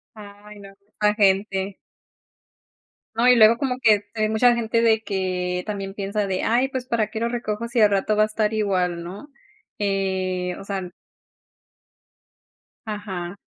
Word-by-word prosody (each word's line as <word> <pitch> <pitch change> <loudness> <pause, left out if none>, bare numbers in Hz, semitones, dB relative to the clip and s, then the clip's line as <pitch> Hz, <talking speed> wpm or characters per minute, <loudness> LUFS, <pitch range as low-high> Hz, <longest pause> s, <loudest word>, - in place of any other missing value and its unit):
Ay, 205 0 -13
no, 195 -1 -12 0.3
esa 210 0 +3
gente. 195 -1 +1 1.4
No, 230 +2 +2
y 250 - +7
luego 225 +1 +6
como 255 -2 -2
que 215 -5 +5
t 220 - -2
hay 215 - +2
mucha 240 +3 +4
gente 230 -1 0
de 220 -1 +3
que 180 -3 -2
también 195 -2 -5
piensa 200 +1 -2
de 185 -1 -2
"Ay, 245 +4 +2
pues, 260 -2 -5
¿para 225 -4 0
qué 220 - -5
lo 230 - 0
recojo 235 -2 -3
si 240 0 0
al 210 -1 +6
rato 200 +2 +1
va 215 - +4
a - - +4
estar 215 0 -1
igual, 185 -5 0
no?", 190 +10 -9 0.5
eh, 190 -2 -1
o - - -9
sea 195 -3 -4 2.0
Ajá. 200 -4 -5
210 Hz, 160 wpm, -23 LUFS, 195-220 Hz, 2.0 s, y